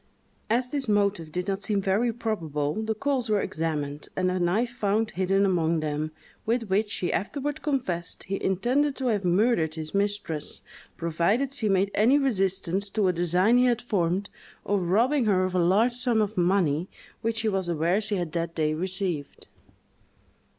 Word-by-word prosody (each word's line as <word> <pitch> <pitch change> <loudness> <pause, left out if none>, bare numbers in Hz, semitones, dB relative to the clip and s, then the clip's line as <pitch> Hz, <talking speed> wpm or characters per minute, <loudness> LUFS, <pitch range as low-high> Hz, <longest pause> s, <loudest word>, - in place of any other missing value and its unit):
As 245 +3 +1
this 280 -3 -2
motive 200 -6 +1
did 180 +3 -3
not 195 0 -1
seem 205 0 0
very 200 +5 +1
probable, 165 -11 -2
the 220 0 -2
coals 260 0 -1
were 210 -1 +3
examined, 150 -4 -3
and 185 -1 +1
a 185 - -1
knife 205 +8 +1
found 215 -1 0
hidden 195 +2 +2
among 170 -3 +1
them, 155 0 -2 0.3
with 230 -2 -1
which, 205 +2 +1
he 175 - -1
afterward 280 - -2
confessed, 235 - -2
he 195 +1 -4
intended 255 +10 +1
to 260 -2 -1
have 205 -3 0
murdered 180 -3 +2
his 155 -1 -6
mistress, 200 -6 -2 0.3
provided 175 - 0
she 220 -6 -1
made 195 +1 +2
any 240 +7 +4
resistance 195 -6 0
to 205 -1 +1
a - - +1
design 180 +7 +3
he 250 - +4
had 240 -2 +2
formed 195 -4 -1 0.3
of 200 -1 +1
robbing 230 +10 +2
her 190 -3 +3
of 185 0 -1
a 185 - +2
large 200 +8 +3
sum 245 -2 +1
of 215 0 0
money 175 -3 +1 0.3
which 225 0 -1
he 220 - -1
was 190 -4 0
aware 170 +5 +1
she 210 -1 -1
had 175 -4 -2
that 165 0 -3
day 155 -1 +1
received. 180 -3 -3
195 Hz, 175 wpm, -26 LUFS, 175-225 Hz, 0.3 s, any